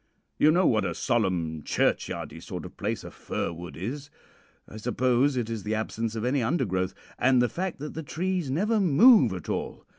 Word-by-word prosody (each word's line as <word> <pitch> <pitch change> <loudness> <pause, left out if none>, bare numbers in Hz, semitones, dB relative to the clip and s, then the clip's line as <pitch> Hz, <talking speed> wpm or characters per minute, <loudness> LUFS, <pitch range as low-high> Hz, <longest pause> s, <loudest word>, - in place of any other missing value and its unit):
You 150 - +6
know 175 +3 +4
what 110 -3 +3
a - - -2
solemn, 90 - 0
churchyardy - - -1
sort - - -6
of - - -10
place - - -3
a - - -9
fir 85 - -4
wood 85 +1 -9
is. 135 - -5 0.6
I 110 - -10
suppose 125 +4 +1
it 120 -3 -1
is 115 -2 -4
the 105 +2 -2
absence 110 +1 -3
of 110 +1 -2
any 130 +2 +1
undergrowth, 110 - 0 0.2
and 130 +1 +4
the 125 - +4
fact 185 +6 -4
that 150 +2 -6
the 160 - -5
trees 175 0 -2
never 210 +11 +1
move 195 - +6
at 90 -4 -6
all. - - -4
125 Hz, 190 wpm, -27 LUFS, 110-155 Hz, 0.6 s, You